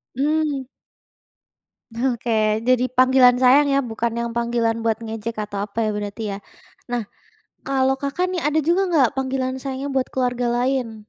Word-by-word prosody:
Mmm. 295 0 0 1.3
Oke 230 -3 0
jadi 255 0 +2
panggilan 255 0 +5
sayang 260 +3 +5
ya, 275 0 +2
bukan 230 0 -3
yang 235 0 -2
panggilan 235 -1 0
buat 225 0 -1
ngejek 225 +1 -5
atau 200 -1 -6
apa 225 +2 -2
ya 215 - 0
berarti 210 +1 -5
ya. 195 - -4 0.5
Nah, 240 -2 -2 0.6
kalau 270 0 +1
Kakak 280 +7 -2
nih 360 -4 -3
ada 300 +1 +2
juga 340 +5 +2
nggak 275 -4 +3
panggilan 260 -1 -2
sayangnya 270 +1 -4
buat 260 - +1
keluarga 245 -1 -1
lain? 245 -2 -1
250 Hz, 150 wpm, -22 LUFS, 230-270 Hz, 1.3 s, panggilan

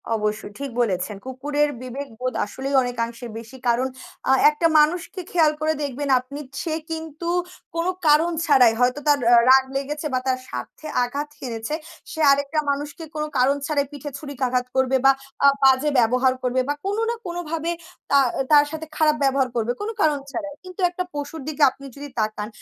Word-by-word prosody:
অবশ্যই 210 -1 -3
ঠিক 280 - -4
বলেছেন। 200 -2 -1
কুকুরের 290 +3 0
বিবেকবোধ 255 -1 -5
আসলেই 270 +6 -4
অনেকাংশে 235 0 -3
বেশি। 230 +3 -10
কারণ 240 +2 +2 0.4
আ - - +7 0.2
একটা 315 +2 +1
মানুষকে 345 +4 +1
খেয়াল 320 -3 +4
করে 315 0 +2
দেখবেন 280 0 -3
আপনি 265 +3 -9 0.2
সে 320 -2 -2 0.2
কিন্তু 320 +1 -5 0.5
কোনো 335 +2 +1 0.2
কারণ 315 +3 +5
ছাড়াই 255 -6 +6
হয়তো 250 +3 +2
তার 290 -1 +5
আ - - +9
রাগ 265 0 +8
লেগেছে 295 +3 -3
বা 255 - +2
তার 255 -1 +1
স্বার্থে 125 - -7 0.2
আঘাত 285 +4 -3
হেনেছে 230 +2 -4 0.4
সে 320 - -7
আরেকটা 285 +2 +1
মানুষকে 290 +3 -5
কোনো 305 0 -2
কারণ 260 +3 +4
ছাড়াই 285 -2 +1
পিঠে 290 0 -7
ছুরিকাঘাত 255 -4 -1
করবে 265 0 +3
বা 270 - +9 0.3
আ - - +9 0.2
বাজে 265 +2 +5
ব্যবহার 250 +3 +3
করবে 255 +1 +1
বা 290 - +2
কোনো 410 +3 0
না 470 - 0
কোনোভাবে 335 -1 -3 0.4
তা 280 - +6 0.3
তার 290 -1 +7
সাথে 315 0 -5
খারাপ 305 -1 +4
ব্যবহার 270 -1 +2
করবে, 235 0 0
কোনো 445 +2 -3
কারণ 300 -2 +3
ছাড়াই। 295 -2 -5
কিন্তু 370 +1 -9
একটা 360 +1 -3
পশুর 290 +2 -5
দিকে 310 -1 0
আপনি 275 +1 -14
যদি 285 +1 -7
তাকান 215 -1 -1
280 Hz, 170 wpm, -23 LUFS, 255-305 Hz, 0.5 s, আ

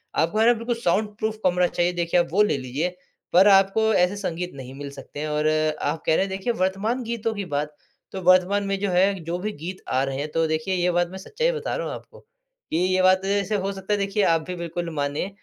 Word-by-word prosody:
आपको, 170 +7 +1
है 225 - +5
ना, 240 - +7
बिल्कुल 235 +1 -2
साउंड-प्रूफ़ 215 +3 -1
कमरा 180 0 +3
चाहिए, 175 0 0
देखिए, 175 0 +1
आप 170 - +1
वो 205 +4 +4
ले 210 -9 +1
लीजिए। 140 +8 -3 0.4
पर 185 +3 +7
आपको 200 +3 +4
ऐसे 180 +1 +3
संगीत 180 -2 -3
नहीं 130 -1 -9
मिल 140 +1 -7
सकते 140 - -10
हैं 155 - -2
और 150 0 0 0.3
आप 160 - -2
कह 160 - +3
रहे - - +2
हैं, - - -7
देखिए, 195 +5 -2
वर्तमान 210 +5 -1
गीतों 230 -1 -2
की 200 -1 -4
बात, 150 -2 -3 0.4
तो 190 - -5
वर्तमान 185 +3 +4
में 195 0 0
जो 200 0 -1
है, 190 +3 +4
जो 170 +2 -3
भी 210 +3 -3
गीत 185 +2 -6
आ 130 +1 +1
रहे 135 -1 -3
हैं, 150 +2 -4
तो 165 +1 +1
देखिए, 160 +4 -1
ये 180 0 +1
बात 175 0 +1
मैं 190 - -7
सच्चाई 470 - -1
बता 470 0 -3
रहा - - -3
हूँ - - -4
आपको - - -13
कि - - -9
ये 185 +1 +2
बात, 185 +1 +4
ऐसे 200 +1 0
हो 195 0 -1
सकता 195 +1 -3
है, - - +2
देखिए, 200 +1 0
आप 165 -3 +3
भी 180 - -4
बिल्कुल 170 0 -4
मानें 145 +5 -2
185 Hz, 245 wpm, -24 LUFS, 170-205 Hz, 0.4 s, ना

